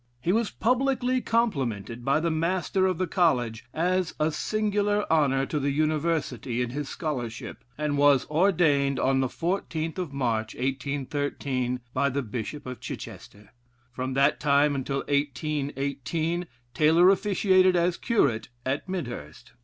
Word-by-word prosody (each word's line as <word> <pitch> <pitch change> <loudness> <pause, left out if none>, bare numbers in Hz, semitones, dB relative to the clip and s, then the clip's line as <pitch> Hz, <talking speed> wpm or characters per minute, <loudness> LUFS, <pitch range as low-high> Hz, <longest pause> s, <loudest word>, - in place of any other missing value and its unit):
He 165 +8 0
was 225 +2 +1
publicly 255 +1 +1
complimented 125 - -1
by 140 +4 +2
the 165 +1 0
Master 180 +3 +1
of 185 -3 0
the 185 - 0
College 125 - +1
as 180 +3 0
a 155 +1 +2
singular 205 +3 0
honor 135 -4 +3
to 150 - -2
the 140 0 0
University 150 -4 -1
in 120 - -4
his 145 +1 -4
scholarship, 125 -8 -5
and 150 -1 -1
was 145 -2 +5
ordained 150 -5 +2
on 135 0 +2
the 130 - +2
14th 165 0 -3
of 175 -6 -3
March, 115 -5 -1
1813, 135 -1 -2
by 140 +2 +2
the 140 +1 -2
bishop 125 +5 -5
of 125 -1 -6
Chichester; 105 +1 -9 0.4
from 130 +1 -4
that 140 +2 +3
time 145 0 +3
until 135 0 -2
1818, 145 +3 -1 0.3
Taylor 165 +5 +5
officiated 185 -2 +3
as 175 0 +2
curate 125 - +1 0.2
at 135 +7 -2
Midhurst. 120 - -6
145 Hz, 140 wpm, -26 LUFS, 130-175 Hz, 0.4 s, was